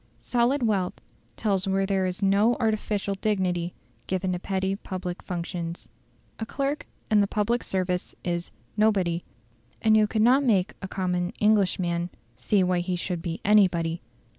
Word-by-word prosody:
Solid 245 +3 +1
wealth 195 -5 0 0.4
tells 195 -4 0
where 195 0 +2
there 190 -1 +1
is 185 +2 -4
no 205 +5 +4
artificial 215 -3 0
dignity 185 -4 -1 0.3
given 185 0 -1
to 180 - -2
petty 190 +1 -1
public 185 -2 -5
functions. 175 -1 -5 0.5
A 220 - -2
clerk 275 +3 -2 0.2
in 210 -1 +6
the 200 - +2
public 220 +4 0
service 180 -1 -2
is 175 -1 -2 0.3
"nobody"; 195 -6 +2 0.6
and 220 -1 +4
you 215 -1 +5
could 215 0 +1
not 260 +4 +5
make 200 -8 +2
a 190 - -4
common 180 -1 -1
Englishman 180 -5 +2 0.3
see 195 - +2
why 180 -1 +2
he 180 +1 -1
should 175 -1 -3
be 165 -1 -4
anybody. 175 -5 +3
190 Hz, 150 wpm, -26 LUFS, 180-215 Hz, 0.6 s, in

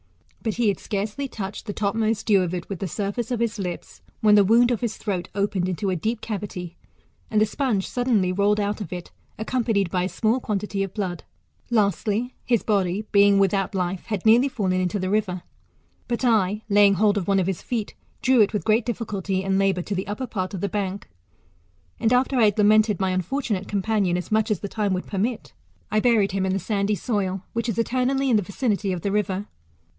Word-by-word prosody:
But 220 -3 -2
he 235 -2 +2
had 200 - -1
scarcely 210 +7 -3
touched 205 -2 -6
the 205 - -3
topmost 215 +1 0
dew 200 -3 +4
of 180 0 -1
it 175 - -5
with 195 -4 -5
the 195 - -2
surface 205 +5 -3
of 245 -2 -1
his 230 -2 -1
lips, 180 -3 -6 0.2
when 210 -1 +5
the 205 -1 +7
wound 235 +5 +4
of 235 - -1
his 235 -3 -2
throat 190 -5 -3
opened 200 -2 0
into 185 +2 -1
a - - 0
deep 220 +7 -2
cavity, 190 -5 -5 0.5
and 215 - +2
the 215 - +5
sponge 215 -3 -1
suddenly 235 -7 +1
rolled 205 +3 +2
out 205 +1 -1
of 190 - -6
it, 180 -1 -6 0.3
accompanied 220 -5 0
by 180 - +1
a 185 - -1
small 225 +5 +1
quantity 205 -3 -2
of 195 -1 -3
blood. 185 -5 -3 0.5
Lastly, 215 +2 +1
his 235 -3 +1
body, 200 -1 0
being 200 -1 +5
without 195 0 +1
life, 180 0 -2
had 210 -3 -3
nearly 240 +5 +5
fallen 185 -7 0
into 185 +3 -1
the 185 -1 -2
river; 195 -4 0 0.6
but 240 +1 -1
I 210 -2 +2
laying 205 -1 +5
hold 205 +1 +3
of 180 - -6
one 195 -1 +3
of 185 - +1
his 190 -2 -2
feet, 225 -4 -3 0.3
drew 255 -2 +5
it 205 - +4
with 205 -6 -2
great 225 +2 +2
difficulty 200 -5 -2
and 195 0 +1
labour 195 -2 +1
to 200 - -4
the 190 0 -3
upper 210 +6 -3
part 190 -5 -4
of 180 - -5
the 200 - 0
bank. 200 -1 -3 0.9
AnSi 225 - +2
after 260 +1 +2
I 225 - +6
had 205 0 +2
lamented 210 -1 +4
my 190 -1 +1
unfortunate 200 - -2
companion, 200 -3 0
as 180 - -6
much 220 0 +2
as 210 -5 0
the 200 - -3
time 205 -1 -1
would 185 - -2
permit, 195 - -3 0.4
I 215 - +3
buried 215 -4 +3
him 190 0 0
in 190 - 0
the - - +1
sandy 200 +2 0
soil, 195 -4 -2
which 230 0 -1
is 220 - -2
eternally 255 +3 +1
in 225 - +5
the - - +2
vichiity 200 0 -1
of 180 -2 -3
the 200 - -1
river. 200 -1 -1
205 Hz, 215 wpm, -24 LUFS, 190-220 Hz, 0.9 s, the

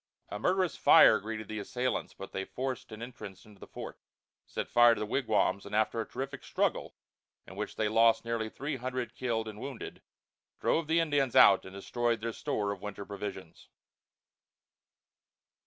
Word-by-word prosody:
A 105 - -5
murderous 185 - +1
fire - - +7
greeted 110 +1 -6
the 110 0 -5
assailants, 125 +5 -3
but 95 - -9
they 95 - -3
forced 130 +3 -5
an 110 +1 -7
entrance 105 -6 -10
into 105 -2 -17
the - - -11
fort, - - -8 0.5
set - - -4
fire 120 -1 +6
to - - -6
the 105 - -2
wigwams, 105 -4 +1
and 100 +1 -6
after 110 +1 +1
a 110 - -6
terrific 135 +1 -6
struggle, - - -1 0.5
in 95 - -12
which 105 +1 -5
they 110 - 0
lost 115 +2 +4
nearly 115 -1 -2
three 140 +4 -4
hundred 125 0 -4
killed 115 -3 -2
and 105 -1 -8
wounded, 135 -1 -7 0.6
drove 165 -2 +1
the 165 +1 +3
Indians 145 -6 +1
out 95 - +7
and 95 +1 -10
destroyed 120 +3 -1
their 115 +1 -4
store 100 -1 -2
of 100 -2 -6
winter 105 -1 -6
provisions. 95 -4 -7
110 Hz, 170 wpm, -30 LUFS, 105-130 Hz, 0.6 s, fire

